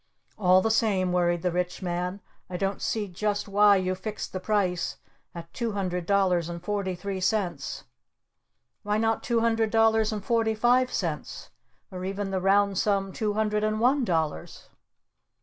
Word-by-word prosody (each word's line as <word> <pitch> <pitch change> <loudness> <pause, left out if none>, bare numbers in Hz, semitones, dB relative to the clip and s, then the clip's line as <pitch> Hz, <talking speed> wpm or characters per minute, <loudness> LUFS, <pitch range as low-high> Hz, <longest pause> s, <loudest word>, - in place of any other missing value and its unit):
"All 185 -2 +4
the 225 - +1
same," 195 -5 +1
worried 175 -1 +1
the 180 - +1
Rich 180 +2 -2
Man, 180 +2 -3 0.3
"I 180 - -4
don't 195 +1 -2
see 215 -2 -1
just 205 +3 -2
why 205 0 +5
you 185 -1 0
fixed 210 +3 -6
the 185 - -3
price 185 -3 -1 0.4
at 170 0 -9
two 235 -3 -2
hundred 180 -3 -3
dollars 185 -4 +2
and 170 0 -5
forty 195 0 -2
three 190 +1 -5
cents? 180 -9 -1 1.0
Why 210 +1 -1
not 225 0 +1
two 235 -2 0
hundred 225 -1 +1
dollars 225 0 +3
and 210 -2 -5
forty 225 -2 +1
five 250 +3 +3
cents? - - -4 0.4
Or 185 -1 -6
even 195 +1 -3
the 190 -1 -1
round 200 0 +3
sum 195 -2 0
two 215 -2 -1
hundred 210 0 0
and 215 0 0
one 260 +4 +3
dollars?" 160 - -2
200 Hz, 165 wpm, -26 LUFS, 180-215 Hz, 1.0 s, why